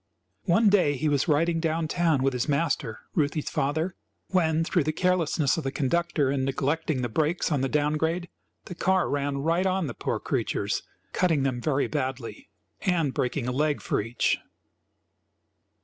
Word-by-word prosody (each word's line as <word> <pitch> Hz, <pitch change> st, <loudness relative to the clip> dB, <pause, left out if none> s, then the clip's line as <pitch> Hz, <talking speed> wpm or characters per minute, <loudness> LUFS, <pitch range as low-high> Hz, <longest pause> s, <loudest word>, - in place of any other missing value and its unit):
One 205 Hz, +6 st, +4 dB
day 180 Hz, -8 st, +3 dB
he 155 Hz, -, 0 dB
was 145 Hz, 0 st, +1 dB
riding 165 Hz, +2 st, +2 dB
down 160 Hz, 0 st, 0 dB
town 160 Hz, -5 st, +1 dB
with 135 Hz, 0 st, +2 dB
his 125 Hz, +3 st, -1 dB
master 140 Hz, -6 st, -1 dB
(Ruthie's 150 Hz, -1 st, 0 dB
father) 155 Hz, +6 st, 0 dB, 0.4 s
when, 165 Hz, -3 st, +2 dB
through 170 Hz, -2 st, +1 dB
the 155 Hz, -, +1 dB
carelessness 165 Hz, -4 st, +1 dB
of 165 Hz, -, -2 dB
the 135 Hz, -, -2 dB
conductor 150 Hz, 0 st, +1 dB
in 135 Hz, -1 st, 0 dB
neglecting 135 Hz, +1 st, -1 dB
the -, -, +1 dB
brakes 155 Hz, +9 st, 0 dB
on 145 Hz, -3 st, +1 dB
the 135 Hz, -, 0 dB
down 150 Hz, +1 st, +1 dB
grade, 165 Hz, +3 st, -1 dB, 0.4 s
the -, -, -7 dB
car 185 Hz, +1 st, +1 dB
ran 140 Hz, 0 st, -1 dB
right 170 Hz, +4 st, +2 dB
on 190 Hz, -1 st, 0 dB
the 125 Hz, -, -4 dB
poor -, -, -2 dB
creatures, -, -, -1 dB, 0.3 s
cutting 165 Hz, -7 st, +2 dB
them 130 Hz, -3 st, -1 dB
very 140 Hz, -1 st, +1 dB
badly 130 Hz, -4 st, -4 dB, 0.3 s
and 165 Hz, -7 st, +1 dB
breaking 125 Hz, 0 st, -1 dB
a -, -, 0 dB
leg 150 Hz, +3 st, +1 dB
for -, -, -1 dB
each. 115 Hz, +3 st, 0 dB
155 Hz, 170 wpm, -26 LUFS, 135-170 Hz, 0.4 s, One